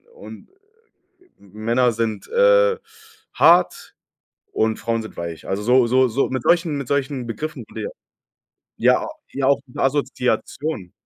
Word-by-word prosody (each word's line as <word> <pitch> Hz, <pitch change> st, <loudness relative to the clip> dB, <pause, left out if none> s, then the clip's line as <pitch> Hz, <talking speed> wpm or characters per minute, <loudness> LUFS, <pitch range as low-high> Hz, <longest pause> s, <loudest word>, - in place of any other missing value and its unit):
und 480 Hz, -, -12 dB, 0.9 s
M 100 Hz, -2 st, -21 dB
Männer 115 Hz, +3 st, +1 dB
sind, 110 Hz, -1 st, -3 dB
äh, -, -, +4 dB, 0.6 s
hart 175 Hz, +2 st, +3 dB, 0.6 s
und 110 Hz, 0 st, 0 dB
Frauen 115 Hz, 0 st, -2 dB
sind 110 Hz, -, -11 dB
weich. 85 Hz, -1 st, -6 dB
Also, 95 Hz, +2 st, -2 dB
so 125 Hz, +2 st, +4 dB
so 130 Hz, +2 st, +3 dB
so 125 Hz, +4 st, 0 dB
mit 130 Hz, -2 st, -2 dB
solchen 170 Hz, -3 st, +2 dB
mit 140 Hz, -3 st, -6 dB
solchen 140 Hz, -3 st, -1 dB
Begriffen 120 Hz, +8 st, -5 dB
wurde, -, -, -7 dB
ja. 470 Hz, -, -4 dB, 0.9 s
Ja, -, -, +4 dB
a -, -, -5 dB, 0.2 s
ja 135 Hz, -1 st, -1 dB
auch 140 Hz, -, +4 dB
mit 125 Hz, -, -14 dB
Assoziation. 135 Hz, -, -1 dB
130 Hz, 145 wpm, -21 LUFS, 110-150 Hz, 0.9 s, äh